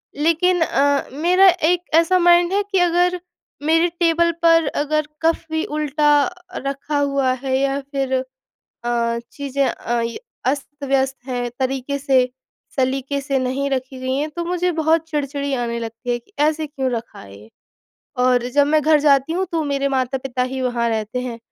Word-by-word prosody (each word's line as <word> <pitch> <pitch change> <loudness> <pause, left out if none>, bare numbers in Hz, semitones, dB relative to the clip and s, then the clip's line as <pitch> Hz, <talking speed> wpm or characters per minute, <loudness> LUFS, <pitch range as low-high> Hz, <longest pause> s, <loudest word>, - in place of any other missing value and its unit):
लेकिन, 335 +4 +2
अ, 285 -3 +2
मेरा 355 +6 +4 0.2
एक 355 0 +1
ऐसा 335 +3 +4
माइंड 350 +1 +4
है 405 +1 +2
कि 385 - +3
अगर 355 +1 +2 0.4
मेरे 325 +3 +3
टेबल 340 0 +3
पर 330 -2 +5
अगर 305 +1 0
कप 330 0 +1
भी 320 0 0
उल्टा 300 0 +2
अ, 360 +3 -7
रखा 280 +2 -2
हुआ 275 -2 +1
है 260 -1 +1
या 275 0 0
फिर 270 -2 -1 0.7
अ, 235 -1 0
चीज़ें 280 -1 -1
अ, 240 0 -2
य 230 0 -4 0.3
अस्त-व्यस्त 275 -1 -1
हैं, 245 -2 -3
तरीके 265 +1 -2
से, 265 -3 +2 0.5
सलीके 270 +1 0
से 275 0 -1
नहीं 260 +2 -1
रखी 260 0 -3
गई 260 0 -2
हैं, 295 +2 -1
तो 340 +2 -4
मुझे 360 +1 0
बहुत 320 0 +1
चिड़-चिड़ी 285 -2 -2
आने 235 -2 -2
लगती 230 +1 -6
है 240 - 0
कि, 240 - -26
"ऐसे 310 +1 +2
क्यों 270 -3 -3
रखा 235 -1 -5
है 100 0 -12
ये?" 105 +2 -16 0.8
और 250 -1 +3
जब 285 -1 +5
मैं 305 +1 +3
घर 305 +1 +4
जाती 285 +1 +3
हूँ, 375 +2 0
तो 325 -2 0
मेरे 280 -1 0
माता-पिता 260 -1 -1
ही 265 - -3
वहाँ 245 -2 0
रहते 220 +2 -2
हैं। 245 -2 -5
280 Hz, 175 wpm, -20 LUFS, 260-320 Hz, 0.8 s, पर